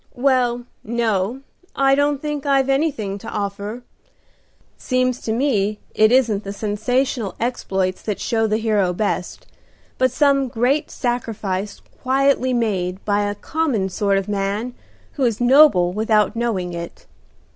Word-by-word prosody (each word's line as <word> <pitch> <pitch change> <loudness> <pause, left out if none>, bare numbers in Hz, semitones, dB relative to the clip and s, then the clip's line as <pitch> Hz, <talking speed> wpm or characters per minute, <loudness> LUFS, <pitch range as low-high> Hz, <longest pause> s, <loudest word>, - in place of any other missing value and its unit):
"Well, 245 -2 +1 0.2
no, 225 +1 -1 0.3
I 270 0 +3
don't 285 0 +1
think 295 -2 -3
I've 275 -1 +3
anything 270 -9 0
to 225 - -8
offer. 205 +3 -4 0.9
Seems 255 -1 -1
to 220 - -3
me 220 -5 +1 0.2
it 215 +1 +4
isn't 230 -5 +3
the 200 - -5
sensational 220 +1 -1
exploits 190 -6 -1
that 210 -2 -3
show 225 -2 0
the 215 0 +1
hero 210 -5 +1
best, 180 -2 -3 0.5
but 255 0 +4
some 275 0 +2
great 250 +5 0
sacrifice 210 -5 -3 0.2
quietly 265 0 +2
made 195 -6 -1
by 205 0 +1
a 205 - -4
common 255 -7 -1
sort 200 +1 +1
of 195 - -2
man 205 +4 -2 0.4
who 275 - -3
is 230 -4 +1
noble 245 -9 +5
without 215 0 +2
knowing 205 -7 -2
it. 170 0 -8
225 Hz, 135 wpm, -21 LUFS, 200-255 Hz, 0.9 s, noble